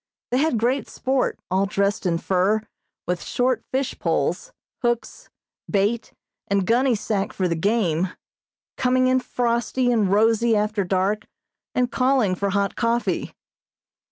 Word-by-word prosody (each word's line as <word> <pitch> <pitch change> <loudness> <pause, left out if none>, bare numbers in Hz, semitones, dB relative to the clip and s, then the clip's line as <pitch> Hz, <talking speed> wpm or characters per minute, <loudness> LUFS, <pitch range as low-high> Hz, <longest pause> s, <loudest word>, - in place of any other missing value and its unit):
They 250 - +2
had 305 -4 +2
great 250 +5 0
sport, 265 0 0
all 190 +2 +2
dressed 200 0 0
in 170 -1 +1
fur, 190 +5 +1 0.5
with 180 0 -1
short 250 0 0
fish 265 0 -2
poles, - - -1 0.3
hooks, 240 -2 -2 0.4
bait 210 +3 0 0.4
and 200 -1 +1
gunny 245 +4 +3
sack 205 -1 -2
for 185 - 0
the 170 - 0
game, 185 -2 +1 0.7
coming 255 0 +2
in 255 0 +3
frosty 245 0 0
and 210 -5 +2
rosy 225 +2 +3
after 210 -1 0
dark, 195 +4 0 0.5
and 250 -1 +1
calling 255 -6 +2
for 200 +2 -1
hot 200 0 0
coffee. 230 -6 -1
220 Hz, 135 wpm, -23 LUFS, 195-245 Hz, 0.7 s, gunny